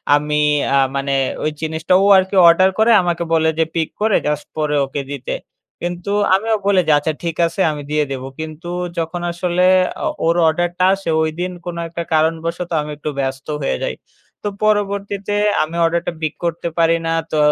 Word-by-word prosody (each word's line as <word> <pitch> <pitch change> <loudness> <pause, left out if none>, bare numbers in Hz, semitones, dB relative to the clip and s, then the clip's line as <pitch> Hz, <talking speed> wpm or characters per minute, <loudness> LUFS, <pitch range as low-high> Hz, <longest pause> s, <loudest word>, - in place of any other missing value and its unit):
আমি 150 0 -1 0.4
আ - - +5 0.2
মানে 140 0 -1 0.3
ওই 155 - 0
জিনিসটা 160 +2 -1
ও - - +3
আরকি 190 +1 0
অর্ডার 185 +3 +6
করে 225 +2 +5
আমাকে 175 -1 -1
বলে 160 0 +3
যে, - - +5
পিক 160 -2 0
করে 215 -1 +3
জাস্ট, 150 -1 -1
পরে 150 -1 0
ওকে 140 +1 -4
দিতে। 135 -2 -4 0.5
কিন্তু 175 +2 -4 0.2
আমিও 220 +3 +1
বলি, 200 -2 +4
যে - - +4
আচ্ছা 155 +2 -2
ঠিক 165 -2 -2
আছে 170 +3 -4
আমি 150 -1 -6
দিয়ে 150 0 +2
দেব। 130 -1 -4 0.2
কিন্তু 160 +2 -7 0.3
যখন 165 +1 -3
আসলে 175 +1 0 0.4
অ - - +1 0.2
ওর 165 +1 +3
অর্ডারটা 175 +3 +1
আসে। 195 -3 -4
ওইদিন 175 +4 -3
কোনো 170 -1 -5
একটা 170 +1 -5
কারণবশত 165 +2 0
আমি 150 - -6
একটু 150 +1 -4
ব্যস্ত 135 0 -3
হয়ে 135 - -1
যাই। 65 - -2 0.5
তো - - -2 0.2
পরবর্তীতে 200 -1 0 0.3
আমি 160 +2 -6
অর্ডারটা 170 +1 0
পিক 155 -1 -1
করতে 170 0 -2
পারি 165 0 +4
না। - - 0 0.2
তো 155 - 0
165 Hz, 180 wpm, -18 LUFS, 155-180 Hz, 0.5 s, অর্ডার